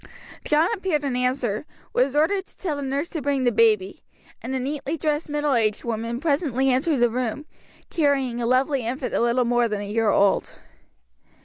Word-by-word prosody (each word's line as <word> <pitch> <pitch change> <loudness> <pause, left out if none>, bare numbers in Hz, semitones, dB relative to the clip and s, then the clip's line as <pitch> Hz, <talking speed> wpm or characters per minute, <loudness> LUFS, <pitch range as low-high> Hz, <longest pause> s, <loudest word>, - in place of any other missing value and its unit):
John 305 +3 +3
appeared 370 -8 -1
in 270 -3 -1
answer, 250 -1 -1 0.3
was 260 +3 +1
ordered 380 +6 +1
to - - -22
tell 335 -6 -2
the - - -4
nurse 280 +3 -2
to 320 - -4
bring 280 -1 0
the 245 - +3
baby, 215 -4 +2 0.4
and 255 +4 -4
a - - 0
neatly 285 +4 -3
dressed 300 +1 -1
middle 295 -1 0
aged 215 -3 +1
woman 230 0 -3
presently 280 -4 +1
entered 275 +4 +1
the 240 0 +4
room, 250 +4 -3 0.5
carrying 270 -6 +1
a 230 - 0
lovely 260 +1 +2
infant 250 +3 -3
a - - +1
little 240 +1 +2
more 240 0 +2
than 210 -2 -3
a - - -4
year 215 +2 0
old. 200 -1 +2
260 Hz, 190 wpm, -24 LUFS, 235-295 Hz, 0.5 s, the